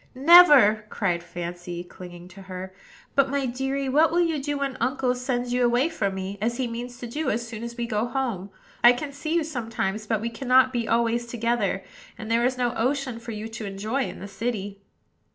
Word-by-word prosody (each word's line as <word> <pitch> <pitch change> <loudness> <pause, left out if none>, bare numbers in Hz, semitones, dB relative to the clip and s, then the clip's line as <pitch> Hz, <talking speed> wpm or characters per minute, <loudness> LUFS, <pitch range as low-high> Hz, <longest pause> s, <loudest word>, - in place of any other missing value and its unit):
"Never," 270 -8 +7
cried 180 -5 -1
Fancy, 175 0 -6
clinging 175 -1 -11
to 190 +2 -13
her. 185 0 -8 0.4
"But, 275 -1 +3
my 280 0 0
deary, 270 +2 -2
what 300 +5 +4
will 345 +2 +2
you 325 -4 -1
do 290 +1 -2
when 275 -1 -2
uncle 255 +1 +1
sends 245 -1 -2
you 250 0 +2
away 245 +5 +3
from 200 -12 -2
me, 190 +1 -5
as 235 +2 -1
he 260 - 0
means 240 +1 -6
to 245 - -7
do 290 +4 -2
as 235 +1 -2
soon 225 -1 -7
as 235 0 -7
we 235 - -1
go 220 0 -1
home? 240 -7 -3 0.3
I 240 +1 +9
can 280 +3 -5
see 310 +3 -3
you 335 - +2
sometimes; 225 -7 -3
but 220 -1 +1
we 230 +2 -3
cannot 255 +2 +3
be 235 -2 -1
always 235 +1 +1
together, 235 0 -1 0.3
and 220 -1 -6
there 230 +1 +3
is 255 +1 +1
no 245 -2 0
ocean 255 0 -1
for 235 0 -8
you 215 0 -5
to 225 -2 -6
enjoy 215 +7 -2
in - - -7
the 200 - -8
city." 205 -1 -4
235 Hz, 210 wpm, -25 LUFS, 215-265 Hz, 0.4 s, I